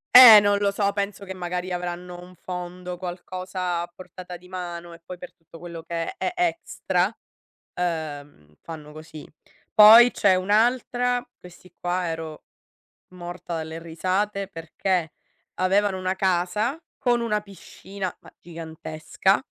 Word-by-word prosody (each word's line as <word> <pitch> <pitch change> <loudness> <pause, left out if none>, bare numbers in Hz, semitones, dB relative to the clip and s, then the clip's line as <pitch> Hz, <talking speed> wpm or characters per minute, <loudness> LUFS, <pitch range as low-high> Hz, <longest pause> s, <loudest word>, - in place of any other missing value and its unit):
Eh 235 -4 +13
non 205 0 +2
lo 200 0 +1
so, 200 0 +1
penso 200 0 -3
che 190 -1 -7
magari 180 0 -4
avranno 180 0 -5
un 180 +1 -13
fondo, 180 0 -6
qualcosa 180 0 -4
a 175 - -7
portata 180 -1 -10
di 180 - -18
mano, 175 -2 -6
e 165 - -14
poi 180 -1 -8
per 180 - -10
tutto 165 0 -16
quello 170 -2 -8
che 170 - -4
è 360 - -2
extra, 350 -2 0 0.6
uhm, 145 - -4
fanno 155 -2 -9
così. 155 0 -11 0.5
Poi 225 +3 +9
c'è 200 -5 +3
un'altra 245 +5 +1
questi 180 0 -16
qua 180 0 -1
ero 160 -1 -6 0.7
morta 175 -1 -6
dalle 160 0 -5
risate, 190 +4 -2
perché 165 -1 -2 0.4
avevano 190 +1 +2
una 185 0 -1
casa, 190 - 0 0.2
con 240 -2 +2
una 210 -2 0
piscina, 195 -1 -8
ma, - - -16
gigantesca, 160 +4 -2
180 Hz, 135 wpm, -24 LUFS, 170-200 Hz, 0.7 s, Eh